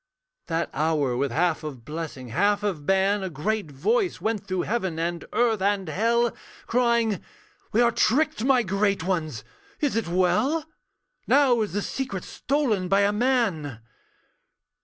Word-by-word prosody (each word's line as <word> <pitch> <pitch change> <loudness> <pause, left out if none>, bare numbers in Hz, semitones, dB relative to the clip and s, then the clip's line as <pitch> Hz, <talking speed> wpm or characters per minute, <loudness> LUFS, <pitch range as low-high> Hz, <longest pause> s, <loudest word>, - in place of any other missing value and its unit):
That 165 0 -1
hour, 150 -4 +1
with 140 +3 0
half 165 +3 +1
of 135 -7 -7
blessing, 150 -5 -6
half 205 - +1
of 170 -8 -3
ban, 195 +1 +2
A 190 - -3
great 190 +3 -2
voice 375 - 0
went 215 -3 -2
through 185 -1 -1
heaven, 190 -7 -2
and 170 +1 -2
earth 230 -4 +2
and 200 -1 +1
hell, 230 +7 +1 0.3
Crying, 235 -4 +1 0.5
'We 225 - +3
are 235 -1 +4
tricked, 280 +4 +1
my 255 -2 +4
great 195 -1 0
ones, 165 -5 -2 0.4
is 290 -5 0
it 225 - 0
well? 220 - +1 0.6
Now 265 -4 +4
is 210 -5 -2
the 205 0 -1
secret 255 -9 -4
stolen 245 -10 -1
by 195 +2 +3
a 200 0 +3
man.' 210 - 0
200 Hz, 150 wpm, -25 LUFS, 165-235 Hz, 0.6 s, are